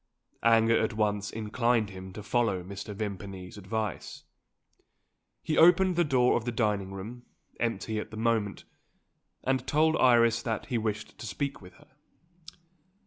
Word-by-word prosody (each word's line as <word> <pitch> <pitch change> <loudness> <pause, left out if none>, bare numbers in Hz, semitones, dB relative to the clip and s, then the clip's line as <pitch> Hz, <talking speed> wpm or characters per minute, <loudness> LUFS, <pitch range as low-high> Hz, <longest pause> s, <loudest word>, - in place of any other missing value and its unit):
Anger 115 0 +4
at 110 +1 0
once 105 -1 0
inclined 110 0 0
him 95 0 -9
to 105 - -8
follow 100 -3 0
Mr. 100 +3 -7
Vimpany's 95 -3 -6
advice. 105 0 -4 1.2
He 155 -1 0
opened 180 +2 +6
the 175 - +3
door 130 -5 +3
of 120 - 0
the 120 - -2
dining 105 -4 0
room, 110 +6 -8 0.3
empty 110 -1 -1
at - - -6
that 110 - -9
moment, 110 -3 0 0.8
and 130 0 0
told 160 +1 +3
Iris 115 -2 +4
that 115 -3 -3
he 125 - -1
wished 110 -1 -4
to 120 - -6
speak 135 +8 -3
with 90 -1 -13
her. 150 +1 -21
110 Hz, 145 wpm, -29 LUFS, 100-120 Hz, 1.2 s, opened